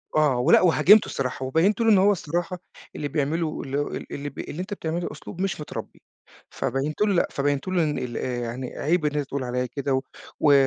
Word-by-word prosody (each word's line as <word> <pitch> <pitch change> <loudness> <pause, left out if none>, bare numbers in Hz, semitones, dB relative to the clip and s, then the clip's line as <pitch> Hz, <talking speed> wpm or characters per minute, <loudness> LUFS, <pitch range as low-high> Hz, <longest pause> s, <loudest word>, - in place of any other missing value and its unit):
آه 150 -4 +3
ولأ 140 +7 +5
وهاجمته 195 +4 +6
الصراحة، 130 0 -3
وبيّنت 170 - +2
له 225 - +4
إن 210 - +7
هو 195 +2 +5
الصراحة 175 0 -2 0.4
اللي 145 - -3
بيعمله 155 +2 -1
اللي 135 +1 -3
هُ 145 - 0
ال - - -7
اللي 145 +1 -4
ب 140 - -13
اللي 165 - -5
أنت 190 +3 -5
بتعمله 170 -2 -3
أسلوب 180 - -8
مش 190 -5 -1
متربّي، 150 - -7 0.5
فبيّنت 140 - -2
له 210 -1 +3
لأ، 175 - +2
فبيّنت 140 +1 -1
له 185 -2 +2
إن 150 -2 -1
ال 125 -2 -4
آآ 125 -1 -2
يعني 120 +2 -5
عيب 160 +2 +1
إن 150 0 0
أنت 145 -2 -1
تقول 140 -1 -3
عليَّ 125 0 -1
كده، 140 +2 -2
و 130 - +2 0.4
و 150 - +5
150 Hz, 220 wpm, -25 LUFS, 135-175 Hz, 0.5 s, إن